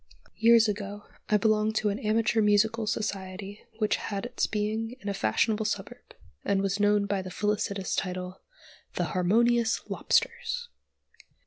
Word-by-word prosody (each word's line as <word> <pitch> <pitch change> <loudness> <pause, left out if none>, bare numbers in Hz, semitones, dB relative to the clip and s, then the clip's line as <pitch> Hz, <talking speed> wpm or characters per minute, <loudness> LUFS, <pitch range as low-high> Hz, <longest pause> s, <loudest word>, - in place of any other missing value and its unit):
Years 230 +1 +6
ago 205 0 -4 0.3
I 210 - +5
belonged 215 +1 +2
to 215 -1 +1
an 200 - -2
amateur 220 +1 +2
musical 215 +2 +2
society 200 -2 -4 0.2
which 215 -2 +1
had 200 +1 -4
its 245 - -1
being 220 +2 -2
in 200 - -5
a - - -1
fashionable 215 +2 +1
suburb, 210 - -5 0.3
and 195 -1 +1
was 195 +1 -1
known 205 0 +3
by 200 -1 -1
the 185 - -7
felicitous 200 0 -1
title, 180 0 -4 0.5
"The - - -2
Harmonious 230 +5 +3
Lobsters." 485 -1 0
210 Hz, 140 wpm, -28 LUFS, 200-220 Hz, 0.5 s, Years